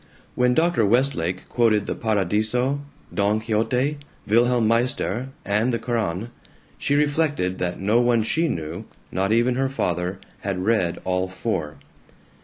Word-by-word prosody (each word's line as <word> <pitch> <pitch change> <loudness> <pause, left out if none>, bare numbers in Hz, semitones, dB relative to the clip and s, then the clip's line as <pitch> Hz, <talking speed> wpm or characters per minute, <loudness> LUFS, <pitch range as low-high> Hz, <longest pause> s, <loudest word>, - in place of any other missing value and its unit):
When 125 0 +2
Dr. 165 -7 +3
Westlake 100 -6 +1
quoted 110 -4 +2
the - - -2
"Paradiso," 110 +6 +1 0.3
"Don 105 +1 +2
Quixote," 125 +6 0 0.3
"Wilhelm 120 +2 +3
Meister," 120 +1 0 0.2
and 105 +5 +1
the 120 - 0
Koran, 115 -3 -2 0.5
she 145 - +1
reflected 145 - +1
that 90 -1 -2
no 110 +5 +3
one 120 -2 +3
she 165 +9 +1
knew, 85 - -4 0.3
not 95 +2 0
even 120 +3 +3
her 135 0 +1
father, 90 -7 -2 0.2
had 95 -2 -3
read 105 -6 +1
all 90 0 0
four. 90 -5 -3
110 Hz, 135 wpm, -23 LUFS, 95-125 Hz, 0.5 s, Dr